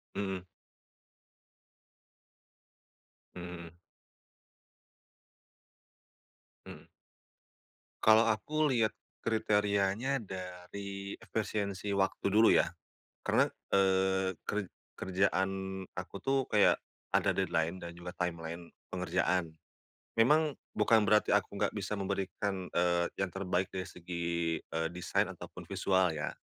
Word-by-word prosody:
Mhm. 95 Hz, -2 st, -2 dB, 2.9 s
Mhm 90 Hz, -, -6 dB, 0.2 s
mhm. 85 Hz, +1 st, -15 dB, 2.9 s
Mhm. -, -, -11 dB, 1.1 s
Kalau 110 Hz, +1 st, +7 dB
aku 145 Hz, +7 st, +1 dB
lihat 110 Hz, -4 st, +2 dB, 0.2 s
kriterianya 105 Hz, +3 st, +1 dB
dari 95 Hz, +1 st, -7 dB
efisiensi 100 Hz, -2 st, -2 dB
waktu 100 Hz, 0 st, +1 dB
dulu 110 Hz, +3 st, +6 dB
ya, -, -, +4 dB, 0.6 s
karena, -, -, +3 dB, 0.2 s
eee, 95 Hz, -1 st, +3 dB
ker 105 Hz, -3 st, -2 dB, 0.2 s
kerjaan 95 Hz, 0 st, 0 dB, 0.2 s
aku 90 Hz, +2 st, -6 dB
tuh 135 Hz, 0 st, +2 dB
kayak 105 Hz, -1 st, +4 dB, 0.3 s
ada -, -, +3 dB
deadline 85 Hz, +3 st, 0 dB
dan 85 Hz, -, -5 dB
juga 90 Hz, 0 st, -7 dB
timeline 85 Hz, -1 st, -4 dB, 0.2 s
pengerjaan. 90 Hz, -1 st, +1 dB, 0.7 s
Memang 150 Hz, +5 st, +4 dB, 0.2 s
bukan 105 Hz, 0 st, +4 dB
berarti 105 Hz, 0 st, +4 dB
aku 100 Hz, -1 st, +2 dB
nggak 100 Hz, 0 st, +1 dB
bisa 100 Hz, +1 st, -2 dB
memberikan, 95 Hz, -1 st, -2 dB
eee, 85 Hz, 0 st, +3 dB
yang 95 Hz, -1 st, -1 dB
terbaik 95 Hz, 0 st, -1 dB
dari 95 Hz, 0 st, -4 dB
segi, 85 Hz, -1 st, -2 dB
eee, 80 Hz, 0 st, -1 dB
desain 90 Hz, +1 st, 0 dB
ataupun -, -, -9 dB
visual 95 Hz, -2 st, +2 dB
ya, 75 Hz, -2 st, -3 dB
95 Hz, 95 wpm, -32 LUFS, 90-105 Hz, 2.9 s, Kalau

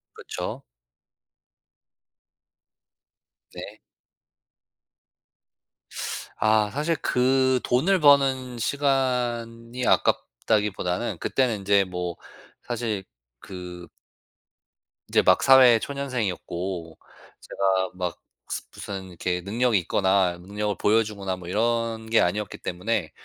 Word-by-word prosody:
그쵸. -, -, -6 dB, 2.9 s
네. -, -, -9 dB, 2.6 s
아 110 Hz, -1 st, +3 dB
사실 150 Hz, +6 st, 0 dB
그 130 Hz, 0 st, +2 dB
돈을 180 Hz, +10 st, +2 dB
버는 135 Hz, -4 st, +4 dB
시간이 125 Hz, -3 st, -1 dB
아깝다기보다는 105 Hz, -2 st, 0 dB
그때는 120 Hz, -6 st, 0 dB
이제 100 Hz, 0 st, +4 dB
뭐 90 Hz, -2 st, -4 dB, 0.5 s
사실 115 Hz, -5 st, -3 dB, 0.4 s
그 90 Hz, 0 st, -9 dB, 1.2 s
이제 -, -, +4 dB
막 -, -, +4 dB
사회 130 Hz, -4 st, +7 dB
초년생이었고 95 Hz, -, -4 dB, 0.4 s
제가 95 Hz, -1 st, 0 dB
막 90 Hz, -2 st, -3 dB, 0.3 s
스 -, -, -3 dB
무슨 95 Hz, -1 st, -6 dB
이렇게 90 Hz, 0 st, -3 dB
능력이 110 Hz, +2 st, +1 dB
있거나 95 Hz, 0 st, +1 dB
능력을 105 Hz, +3 st, -3 dB
보여 110 Hz, +2 st, +3 dB
주거나 100 Hz, -4 st, -4 dB
뭐 90 Hz, -1 st, -10 dB
이런 115 Hz, +2 st, -1 dB
게 115 Hz, -, +4 dB
아니었기 105 Hz, +4 st, -1 dB
때문에 90 Hz, -1 st, -2 dB
110 Hz, 195 characters per minute, -25 LUFS, 95-125 Hz, 2.9 s, 사회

